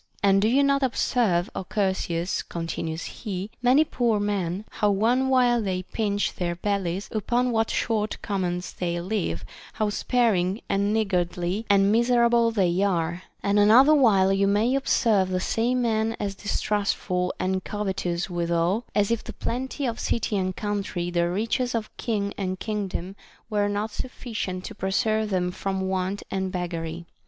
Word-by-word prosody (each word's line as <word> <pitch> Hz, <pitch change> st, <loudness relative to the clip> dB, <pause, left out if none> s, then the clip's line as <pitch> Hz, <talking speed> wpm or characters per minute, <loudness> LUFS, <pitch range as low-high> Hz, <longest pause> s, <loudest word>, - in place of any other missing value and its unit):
And 195 Hz, -1 st, +5 dB
do 210 Hz, -, +3 dB
you 265 Hz, +5 st, +4 dB
not 280 Hz, 0 st, +2 dB
observe, 230 Hz, -8 st, +1 dB
Ο -, -, -3 dB
Chersias, 190 Hz, -3 st, -1 dB
continues 165 Hz, -1 st, -4 dB
he, 200 Hz, -2 st, -5 dB
many 255 Hz, +5 st, +5 dB
poor 240 Hz, -7 st, 0 dB
men, 200 Hz, -1 st, -2 dB
— -, -, -26 dB
how 210 Hz, -, +3 dB
one 235 Hz, +6 st, +2 dB
while 245 Hz, -2 st, +4 dB
they 185 Hz, -3 st, -2 dB
pinch 205 Hz, +1 st, -1 dB
their 175 Hz, -1 st, -2 dB
bellies, 195 Hz, 0 st, -2 dB
upon 240 Hz, +4 st, 0 dB
what 225 Hz, -1 st, +1 dB
short 215 Hz, -2 st, -1 dB
commons 180 Hz, -3 st, -2 dB
they 175 Hz, -1 st, -2 dB
live, 175 Hz, -, -2 dB, 0.3 s
how 215 Hz, -1 st, 0 dB
sparing 205 Hz, -5 st, +1 dB
and 200 Hz, +1 st, +1 dB
niggardly 185 Hz, -1 st, -1 dB
and 200 Hz, 0 st, +5 dB
miser 235 Hz, +1 st, +4 dB
able 235 Hz, -1 st, +4 dB
they 190 Hz, -5 st, +1 dB
are; 175 Hz, -3 st, 0 dB, 0.2 s
and 200 Hz, +1 st, +2 dB
another 240 Hz, +9 st, +7 dB
while 200 Hz, -9 st, +4 dB
you 195 Hz, 0 st, +2 dB
may 210 Hz, +5 st, +2 dB
observe 225 Hz, -8 st, +2 dB
the 185 Hz, 0 st, 0 dB
same 245 Hz, +6 st, 0 dB
men 225 Hz, -1 st, +1 dB
as 200 Hz, -1 st, -2 dB
distrustful 200 Hz, -2 st, -1 dB
and 185 Hz, 0 st, -1 dB
covetous 190 Hz, -4 st, -2 dB
withal, 175 Hz, +4 st, 0 dB
as 205 Hz, +1 st, +2 dB
if 230 Hz, -, 0 dB
the -, -, -8 dB
plenty 265 Hz, +3 st, -3 dB
of 235 Hz, -2 st, -2 dB
citv 230 Hz, -, -1 dB
and 185 Hz, -1 st, -1 dB
countrv, 200 Hz, -4 st, -3 dB
the 170 Hz, 0 st, +2 dB
riches 230 Hz, +6 st, -1 dB
of 220 Hz, -2 st, -4 dB
kins: 205 Hz, -4 st, -2 dB
and 185 Hz, -1 st, -2 dB
kingdom 195 Hz, -3 st, -3 dB, 0.4 s
were 205 Hz, -1 st, +1 dB
not 205 Hz, +2 st, -2 dB
sufficient 210 Hz, -7 st, -5 dB
to 225 Hz, -, -6 dB
preserve 215 Hz, +2 st, 0 dB
them 180 Hz, -2 st, 0 dB
from 190 Hz, +1 st, -3 dB
want 190 Hz, +1 st, -2 dB
and 190 Hz, -1 st, -1 dB
beggary. 170 Hz, -2 st, -4 dB
200 Hz, 160 wpm, -25 LUFS, 185-225 Hz, 0.4 s, another